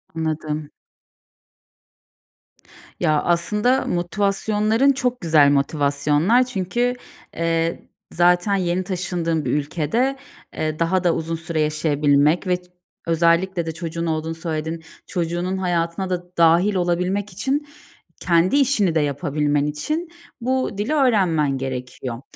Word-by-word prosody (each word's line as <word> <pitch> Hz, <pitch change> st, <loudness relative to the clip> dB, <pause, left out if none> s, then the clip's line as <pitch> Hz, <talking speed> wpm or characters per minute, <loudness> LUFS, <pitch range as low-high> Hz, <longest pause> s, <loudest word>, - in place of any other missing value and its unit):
Anladım. 155 Hz, -2 st, -3 dB, 2.3 s
Ya, 155 Hz, -1 st, +2 dB
aslında 210 Hz, +9 st, +1 dB
motivasyonların 210 Hz, +7 st, +1 dB
çok 250 Hz, -2 st, -1 dB
güzel 155 Hz, -4 st, +5 dB
motivasyonlar. 145 Hz, -, +2 dB
Çünkü, 240 Hz, +2 st, -1 dB, 0.4 s
eee, 165 Hz, 0 st, -1 dB, 0.2 s
zaten 175 Hz, +4 st, +3 dB
yeni 180 Hz, -1 st, 0 dB
taşındığın 175 Hz, -4 st, -2 dB
bir -, -, 0 dB
ülkede, 165 Hz, -, 0 dB, 0.4 s
eee, 155 Hz, 0 st, -3 dB
daha 180 Hz, +2 st, +1 dB
da 175 Hz, -2 st, +2 dB
uzun 165 Hz, +1 st, -3 dB
süre 160 Hz, -1 st, -3 dB
yaşayabilmek 150 Hz, +2 st, +2 dB
ve 180 Hz, 0 st, +2 dB
ç -, -, -23 dB, 0.4 s
özellikle 170 Hz, +2 st, +2 dB
de 165 Hz, -, -3 dB
çocuğun 170 Hz, 0 st, -4 dB
olduğunu 160 Hz, 0 st, -2 dB
söyledin, 160 Hz, 0 st, -4 dB, 0.2 s
çocuğunun 175 Hz, +1 st, -2 dB
hayatına 175 Hz, 0 st, -1 dB
da 180 Hz, -1 st, -2 dB
dâhil 170 Hz, +5 st, +4 dB
olabilmek 180 Hz, +3 st, 0 dB
için, 270 Hz, +10 st, -2 dB, 0.5 s
kendi 175 Hz, +6 st, +2 dB
işini 245 Hz, -, +2 dB
de 160 Hz, -, +4 dB
yapabilmen 145 Hz, 0 st, 0 dB
için 305 Hz, -, -3 dB, 0.3 s
bu 255 Hz, -3 st, -1 dB
dili 210 Hz, +9 st, -1 dB
öğrenmen 185 Hz, -, +2 dB
gerekiyor. 125 Hz, -2 st, -5 dB
170 Hz, 115 wpm, -21 LUFS, 155-195 Hz, 2.3 s, güzel